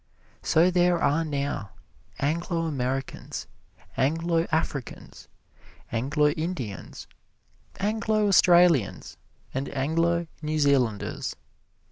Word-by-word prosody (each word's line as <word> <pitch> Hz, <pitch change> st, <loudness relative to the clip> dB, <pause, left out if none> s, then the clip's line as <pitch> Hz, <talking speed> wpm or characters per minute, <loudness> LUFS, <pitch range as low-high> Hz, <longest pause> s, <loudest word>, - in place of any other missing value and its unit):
So 170 Hz, +3 st, +3 dB
there 175 Hz, -1 st, +3 dB
are 150 Hz, +2 st, +2 dB
now 140 Hz, -9 st, -3 dB, 0.4 s
Anglo 165 Hz, +3 st, -1 dB
Americans, 135 Hz, -3 st, -3 dB, 0.5 s
Anglo 165 Hz, +4 st, +1 dB
Africans, 150 Hz, -5 st, -3 dB, 0.6 s
Anglo 145 Hz, +6 st, +2 dB
Indians, 150 Hz, -, -5 dB, 0.7 s
Anglo 215 Hz, 0 st, +1 dB
Australians, 175 Hz, -, +4 dB, 0.4 s
and 135 Hz, +2 st, -3 dB
Anglo 165 Hz, +5 st, 0 dB, 0.2 s
New 155 Hz, 0 st, -2 dB
Zealanders. 135 Hz, -8 st, +1 dB
155 Hz, 80 wpm, -26 LUFS, 140-170 Hz, 0.7 s, Australians